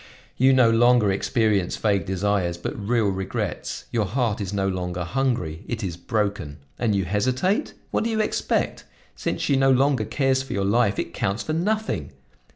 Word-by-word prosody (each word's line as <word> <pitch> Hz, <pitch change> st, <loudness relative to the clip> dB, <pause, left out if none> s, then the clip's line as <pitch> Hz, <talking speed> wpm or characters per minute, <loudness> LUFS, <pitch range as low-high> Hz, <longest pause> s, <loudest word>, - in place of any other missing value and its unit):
You 130 Hz, +2 st, +4 dB
no 125 Hz, -3 st, +5 dB
longer 120 Hz, -2 st, +4 dB
experience 100 Hz, -1 st, +1 dB
vague 100 Hz, -3 st, +1 dB
desires, 95 Hz, -2 st, 0 dB
but 85 Hz, -, -4 dB
real 110 Hz, 0 st, +1 dB
regrets; 95 Hz, 0 st, -4 dB
your 110 Hz, -4 st, 0 dB
heart 115 Hz, 0 st, -1 dB
is 100 Hz, -1 st, -3 dB
no 100 Hz, -1 st, 0 dB
longer 90 Hz, -2 st, -2 dB
hungry, 115 Hz, -7 st, -1 dB
it 115 Hz, -2 st, -4 dB
is 90 Hz, -4 st, -3 dB
broken! 100 Hz, -6 st, -2 dB, 0.2 s
And 110 Hz, -4 st, +1 dB
you 95 Hz, -2 st, 0 dB
hesitate? 130 Hz, -, 0 dB, 0.2 s
What -, -, 0 dB
do -, -, 0 dB
you 220 Hz, -1 st, -1 dB
expect? 215 Hz, -, -1 dB, 0.3 s
Since -, -, -3 dB
she 140 Hz, -, +2 dB
no 135 Hz, 0 st, +4 dB
longer 130 Hz, -3 st, +3 dB
cares 130 Hz, +4 st, +1 dB
for 135 Hz, -, -6 dB
your 100 Hz, -1 st, 0 dB
life, 100 Hz, 0 st, +2 dB
it 85 Hz, -, -3 dB
counts 100 Hz, +5 st, -1 dB
for 155 Hz, -, -3 dB
nothing! 215 Hz, +7 st, -1 dB
110 Hz, 175 wpm, -24 LUFS, 95-130 Hz, 0.3 s, no